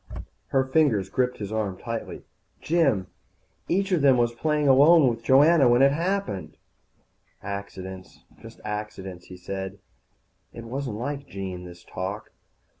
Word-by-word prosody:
Her 135 -1 +2
fingers 130 -9 +2
gripped 125 +2 0
his 100 -1 -6
arm 105 -4 -2
tightly. 115 +1 -6 0.4
"Jim, 145 - +1 0.6
each 195 +2 0
of 175 -5 +2
them 135 -2 +5
was 120 -1 +1
playing 150 +4 0
alone 145 +3 +7
with 115 -2 -1
Joanna 140 +2 +5
when 120 +2 +5
it 140 - +6
happened." 165 - -2 0.9
"Accidents, 95 -2 -7 0.2
just - - -12
accidents," 105 -4 -6
he 90 - -11
said. 95 +2 -6 0.8
It 115 - -9
wasn't 125 -1 -4
like 140 +3 -4
Jean, 95 -4 -6
this 85 -1 -12
talk. 105 +4 -6
115 Hz, 135 wpm, -25 LUFS, 95-140 Hz, 0.9 s, alone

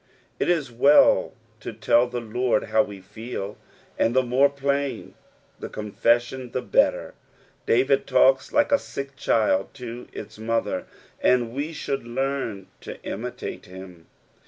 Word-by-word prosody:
It - - 0
is 155 -8 +1
well 140 +5 +5 0.3
to - - -6
tell 115 +3 +3
the 125 0 -4
Lord 120 0 0
how 110 - +2
we 100 -2 -6
feel, 105 +1 -6 0.4
and 115 - +2
ttae 130 -1 +3
more 135 +3 +4
plain 140 0 -2 0.5
the - - -6
coafesBiod 120 +4 0
the 130 - -2
better: - - +1 0.5
David 135 +3 +3
talks 135 +1 +4
like 290 0 +2
a 280 - +5
sick 140 0 -7
child 110 -6 +1
to 125 -2 -8
its - - -9
mother, 115 +1 -1 0.3
and 120 -2 +2
we 145 +4 -3
should 140 -4 -3
learn 130 -5 -2 0.2
to - - -8
imitate - - -6
him. 90 -2 -12
125 Hz, 140 wpm, -24 LUFS, 110-135 Hz, 0.5 s, well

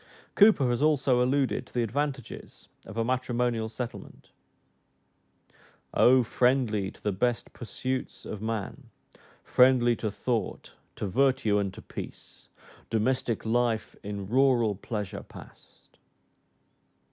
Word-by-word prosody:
Cowper 200 -10 +6
has 120 - -1
also 140 -5 +3
alluded 135 +1 0
to - - -22
the 120 - +2
advantages 135 +1 -4 0.2
of 105 - -9
a 115 - +1
matrimonial 120 -2 -1
settlement, 120 +1 -8 1.6
"O 130 +1 +5
friendly 120 -5 +1
to - - -16
the 105 - +1
best 115 +5 -1
pursuits 130 +2 -5
of 105 - -6
man, 110 -2 -4 0.5
Friendly 125 -2 +4
to 110 - -2
thought, 115 +2 -3 0.2
to - - -4
virtue, 125 -1 +2
and 100 -1 -1
to - - -11
peace, - - -10 0.4
Domestic 115 0 0
life 115 -2 0
in 100 -1 -5
rural 120 -2 +3
pleasure 105 -1 -5
pass'd." - - -16
120 Hz, 115 wpm, -28 LUFS, 110-130 Hz, 1.6 s, Cowper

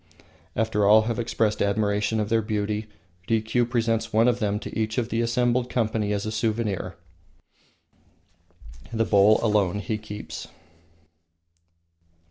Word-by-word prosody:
After 110 -1 0
all 110 +1 +7
have 115 0 -2
expressed 115 -2 0
admiration 105 +1 +1
of 105 -1 -1
their 115 0 +2
beauty, 105 0 -2 0.4
Rikiu 115 +2 +1
presents 115 -2 0
one 110 +2 +4
of 120 -1 +2
them 105 -2 0
to - - -7
each 110 -1 -2
of 120 -2 0
the 115 0 0
assembled 120 +1 +1
company 110 -3 0
as 100 0 -1
a 110 - -3
souvenir. 110 -4 -2 2.0
The 115 0 0
bowl 105 +1 +5
alone 105 -4 +2
he 105 +1 -3
keeps. 105 -1 -8
110 Hz, 130 wpm, -25 LUFS, 105-115 Hz, 2.0 s, all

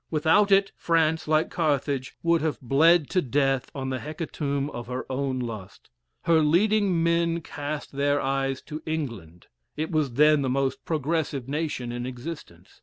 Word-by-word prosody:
Without 160 +6 +3
it, 195 0 +4
France, 160 -1 +1
like 155 0 +2
Carthage, 140 -4 -1
would 170 -1 +3
have 155 -1 -1
bled 150 +4 +4
to 185 - +2
death 135 -1 0
on 130 -1 -3
the 130 - -2
hecatomb 145 -3 -3
of 120 -1 -7
her 125 +1 -4
own 130 0 -1
lust. 110 - -7 0.3
Her 165 -1 +4
leading 185 +2 +3
men 170 0 +1
cast 145 -1 -5
their 145 +1 +1
eyes 135 -1 -1
to 155 +1 -7
England; 115 - -5 0.3
it 155 +3 -2
was 150 -6 0
then 150 +2 +5
the 135 - -1
most 135 0 -1
progressive 155 -4 -1
nation 145 -4 -3
in 120 +1 -4
existence. 125 - -9
145 Hz, 160 wpm, -26 LUFS, 130-160 Hz, 0.3 s, then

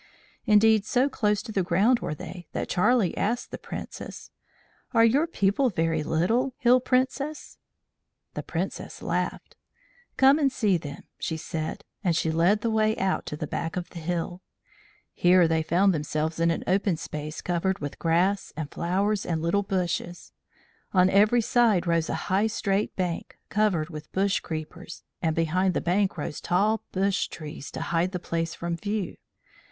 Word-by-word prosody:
Indeed, 215 0 +5
so 250 +5 +2
close 210 -5 0
to 225 - -7
the 200 - +1
ground 195 +8 +3
were 150 - -3
they 175 +3 -9
that - - -3
Charlie 200 +1 +2
asked 235 +4 -1
the - - -6
Princess: - - -8 0.6
"Are 230 0 +7
your 280 +8 +3
people 245 -2 +2
very 165 -4 0
little, 225 - +1
Hill 250 +1 +5
Princess?" 260 +4 -1 0.7
The - - -4
Princess - - -5
laughed. - - -2 0.6
"Come 270 +3 +6
and 275 -3 +3
see 210 -7 +2
them," 145 -3 -8 0.2
she 160 - -2
said, 160 +4 -4 0.2
and 175 -4 +2
she 160 0 +1
led 175 +6 +3
the 230 - 0
way 220 0 +2
out 190 -1 -1
to 150 - -4
the 155 - -3
back 165 +3 -4
of 180 -1 -4
the 170 - -7
hill. 175 +2 -3 0.7
Here 175 -1 +5
they 160 0 +1
found 185 +5 +3
themselves 155 +1 -2
in 165 0 +3
an 165 - -1
open 190 -2 +1
space 155 -1 -6
covered 180 +2 -1
with 145 -1 -6
grass 175 +4 +1
and 155 -2 -4
flowers 195 +4 0
and 165 -2 -1
little 170 +5 +1
bushes. 175 -2 -3 0.6
On 185 0 +5
every 215 +4 +5
side 225 -5 +3
rose 170 -1 +1
a - - -1
high 195 +4 +2
straight 205 -2 -1
bank, 180 -3 -3
covered 190 -7 +1
with 150 -1 -9
bush 195 +1 +1
creepers, 155 0 -7 0.2
and 160 -1 0
behind 180 +3 +1
the - - +2
bank 190 +2 +1
rose 150 0 -4
tall 205 +5 +1
bush 195 +1 +1
trees 150 -3 -8
to - - -6
hide 170 +2 0
the 180 - -2
place 165 -1 -3
from 170 0 -3
view. 205 +1 -3
185 Hz, 170 wpm, -26 LUFS, 165-215 Hz, 0.7 s, Are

